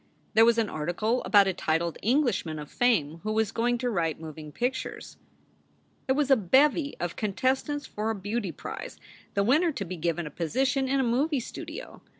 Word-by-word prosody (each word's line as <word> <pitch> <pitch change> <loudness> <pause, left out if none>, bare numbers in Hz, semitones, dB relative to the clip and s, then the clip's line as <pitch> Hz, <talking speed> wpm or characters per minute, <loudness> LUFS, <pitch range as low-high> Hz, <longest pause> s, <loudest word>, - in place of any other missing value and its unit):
There 225 +1 +7
was 235 0 +4
an 225 -2 +2
article 195 +10 -1
about 200 +1 +6
a 190 - 0
titled 165 0 -1
Englishman 230 - +1
of 150 -1 -8
fame 170 -11 +1
who 215 - -2
was 220 -2 +1
going 240 +1 +1
to 245 +1 -1
write 165 -6 -1
moving 155 -1 -8
pictures. 250 - -3 0.9
There 265 - +2
was 285 -1 +1
a - - +9
bevy 280 - +3
of 175 -1 -3
contestants 260 +7 -1
for 215 +1 -3
a 225 - 0
beauty 205 0 -3
prize, - - -7 0.4
the 200 - +3
winner 310 - +3
to 200 - -4
be 180 +1 -6
given 170 +1 -1
a 150 - -7
position 265 - 0
in 270 +1 +1
a - - +3
movie 265 +5 +1
studio. 235 - -8
220 Hz, 185 wpm, -27 LUFS, 175-260 Hz, 0.9 s, a